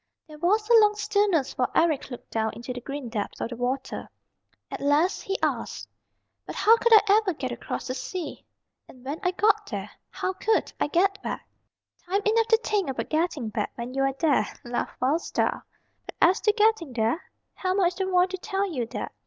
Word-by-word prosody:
There 305 -1 -12
was 420 +6 +2
a 475 - +4
long 420 -1 +4
stillness 410 -8 +1
while 250 - +2
Eric 315 -5 +2
looked 245 - -10
down 220 -1 -1
into 240 +2 -6
the 245 - -7
green 275 0 -5
depths 215 -3 -4
of - - -2
the 240 - -6
water. 250 +3 -3 0.6
At - - -5
last 295 +6 +2
he 390 +1 -2
asked, - - -2 0.6
"But - - -6
how 450 +2 +6
could 470 - +1
I 425 -1 +7
ever 385 -6 -2
get 260 -3 -4
across 240 - -5
the 255 - -3
sea? 345 +5 -5 0.4
And 255 0 -16
when 290 +4 -4
I 360 - +1
got 420 +3 +2
there - - -5 0.2
how 370 - -3
could 440 +4 0
I - - +1
get 390 +5 +1
back?" - - -5 0.6
"Time 395 +3 +1
enough 450 +1 +3
to 450 - +5
think 400 -8 0
about 265 - -3
getting 310 -7 0
back 210 -1 -3
when 240 +1 -6
you 270 - -1
are 270 0 +1
there," 315 -2 +2 0.2
laughed 240 0 -4
Wild 285 +6 +2
Star. - - -1 0.4
"But - - -8
as 360 +3 +4
to 425 - +3
getting 425 - +2
there, 230 +8 0 0.3
Helma 375 +1 0
is 350 0 +2
the 380 +1 -2
one 365 -1 +4
to 375 - -4
tell 390 +1 -2
you 245 -5 -2
that. - - -5
340 Hz, 205 wpm, -26 LUFS, 260-405 Hz, 0.6 s, I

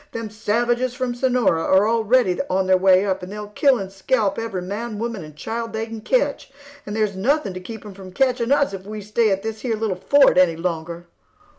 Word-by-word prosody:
Them 230 -2 -5
savages 240 +4 0
from 255 -1 -2
Sonora 245 -9 +1
are 190 +5 +3
already 225 -3 +2
on 190 +1 +1
their 185 0 +4
way 185 +1 +4
up, 190 -1 -1
and 180 +1 -8
they'll 210 0 -7
kill 265 +5 +3
and 195 -3 -6
scalp 200 +1 0
every 210 -6 -4
man, 210 +4 -5
woman, 225 -4 -4
and 155 -1 -12
child 230 +7 -5
they 220 0 -2
can 225 -1 -8
ketch, - - 0 0.4
and 205 - -4
there's 215 -3 0
nothing 225 +1 0
to 185 - -6
keep 220 +4 -9
them 205 -2 -10
from 190 -1 -11
ketching 250 +2 0
us, 285 -6 +3
if 195 0 -8
we 215 0 -6
stay 215 +2 +1
at 195 0 -1
this 220 -1 -5
here 235 -3 -1
little 215 -3 -2
fort 280 -9 +6
any 175 -3 +4
longer." 170 0 -4
215 Hz, 220 wpm, -22 LUFS, 190-235 Hz, 0.4 s, fort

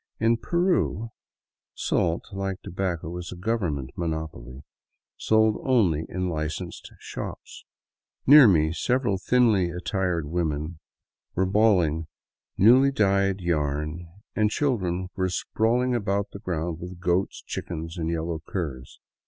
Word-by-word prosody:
In 115 +1 +3
Peru, 115 - 0 0.6
salt, 85 0 0
like 95 -1 -3
tobacco, 85 -2 -3
is 85 -1 -7
a - - -6
government 90 - -2
monopoly, 80 -6 -5 0.5
sold 110 -1 +3
only 95 - +2
in 90 0 -2
licensed 80 -3 -4
shops. - - -8 0.6
Near 145 -2 +9
me 80 -5 +3
several 110 - 0
thinly 110 -6 +3
attired 90 -1 -1
women 80 0 -2 0.6
were 95 - +2
balling 90 -6 +2 0.5
newly 130 +7 +6
dyed 100 -4 +2
yarn, 75 0 -1 0.3
and 105 -1 +3
children 95 -9 -1
were 95 -1 0
sprawling 120 +7 0
about 100 -3 -1
the 100 - -8
ground 85 -2 -3
with 90 0 -8
goats, 90 +1 0
chickens, 80 0 -5
and 80 0 -1
yellow 85 0 -2
curs. 70 -9 -5
90 Hz, 120 wpm, -26 LUFS, 80-105 Hz, 0.6 s, Near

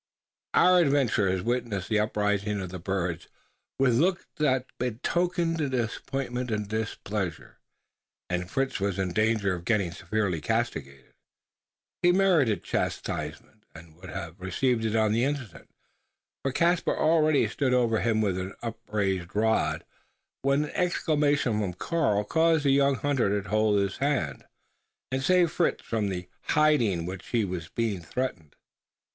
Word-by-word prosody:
Our 180 0 +6
adventurers 120 - +2
witnessed 115 -5 -2
the 110 -1 +2
uprising 105 -1 0
of 95 -2 -4
the 90 0 -7
birds 90 -2 -2 0.5
with 130 -2 +3
looks 175 +3 +1
that 130 -5 +2
betokened 165 +8 0
disappointment 125 +1 -3
and 105 -2 -2
displeasure; 105 -3 -4 0.7
and 90 0 -2
Fritz 135 0 -1
was 100 -1 -1
in 95 -2 -1
danger 110 -2 +2
of 85 -2 -5
getting 100 -3 +1
severely 95 -1 -2
castigated. 80 - -3 0.9
He 175 0 +5
merited 175 - +3
chastisement; - - -4
and 80 -1 -13
would 90 +2 -12
have 85 +3 -7
received 115 +6 0
it 110 0 0
on 110 -1 +3
the 115 +3 +2
instant 135 - -4 0.7
for 135 - -1
Caspar 170 +5 +1
already 155 -2 +3
stood 135 -3 -1
over 115 -3 +2
him 110 -2 +1
with 95 -3 0
an 95 +1 -5
upraised 100 -5 -2
rod 110 +1 +1 0.6
when 140 +2 +2
an 150 - -6
exclamation 145 -9 +1
from 100 -4 -2
Karl 120 - 0
caused 160 +5 +2
the 140 - +5
young 140 0 +4
hunter 120 -6 +1
to 95 -2 -9
hold 110 -1 +3
his 100 -1 -1
hand, 135 - -1 0.7
and 130 0 -1
saved 180 +2 +3
Fritz 175 - 0
from 110 -3 -1
the 90 -1 -4
"hiding" 130 - +2
with 95 +2 -5
which - - -16
he 115 -3 +1
was 90 -3 -5
being 110 -6 -2
threatened. 85 - -4
110 Hz, 145 wpm, -27 LUFS, 95-140 Hz, 0.9 s, Our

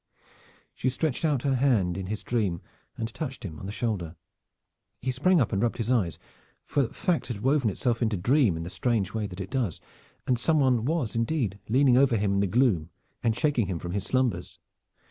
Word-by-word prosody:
She 130 - 0
stretched 135 +3 -2
out 145 -6 +1
her 140 - +2
hand 120 -10 +2
in 95 -1 -4
his 105 +1 -4
dream 105 -8 0 0.4
and 115 0 -4
touched 135 -8 -5
him 80 -5 -7
on 95 - -7
the - - -4
shoulder. 100 -7 -3 0.8
He 130 - -1
sprang 170 +8 +3
up 125 - +1
and 95 - +1
rubbed 120 -1 0
his 115 0 -1
eyes, 95 - +1 0.5
for 140 -4 +1
fact 170 +7 -1
had 110 -5 -5
woven 135 -3 +3
itself 115 +4 -1
into 110 -3 +1
dream 115 - +3
in 80 - -4
the 85 - -6
strange 105 0 0
way 110 -2 -1
that 95 -1 -10
it 95 0 -6
does, 120 - -1 0.5
and 125 -2 +1
some 155 +5 +2
one 125 -4 +3
was 145 -7 -1
indeed 115 - 0
leaning 130 +1 +5
over 130 -3 +4
him 100 -1 +1
in 100 - +2
the 100 - +2
gloom, 100 - +2 0.3
and 115 -2 +1
shaking 135 -9 +1
him 90 -2 -2
from 85 +1 -6
his 100 +1 -2
slumbers. 120 -8 -1
115 Hz, 205 wpm, -27 LUFS, 100-130 Hz, 0.8 s, leaning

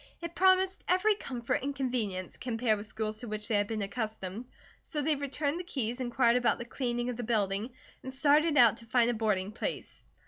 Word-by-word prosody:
It 335 0 -6
promised 375 +1 +3
every 370 +4 +4
comfort 250 - -3
and 280 +2 -3
convenience, 225 -9 -2
compared 225 -3 0
with 210 - -7
schools 215 0 -4
to 245 - -7
which 210 -1 -4
they - - -1
had 205 -1 +2
been 215 -1 -2
accustomed, 215 +1 -4 0.3
so 295 -2 -3
they 305 +1 +2
returned 285 +3 -1
the - - -4
keys, 245 -7 -3
inquired 240 -1 +3
about 245 -1 +2
the 235 - -6
cleaning 240 0 -2
of 240 - -7
the 245 - -3
building, 210 -1 0 0.3
and 260 - -6
started 295 +3 +3
out 235 -3 +7
to 230 - -12
find 240 +1 +3
a - - -2
boarding 210 -3 0
place. 235 - -5
240 Hz, 205 wpm, -30 LUFS, 215-280 Hz, 0.3 s, out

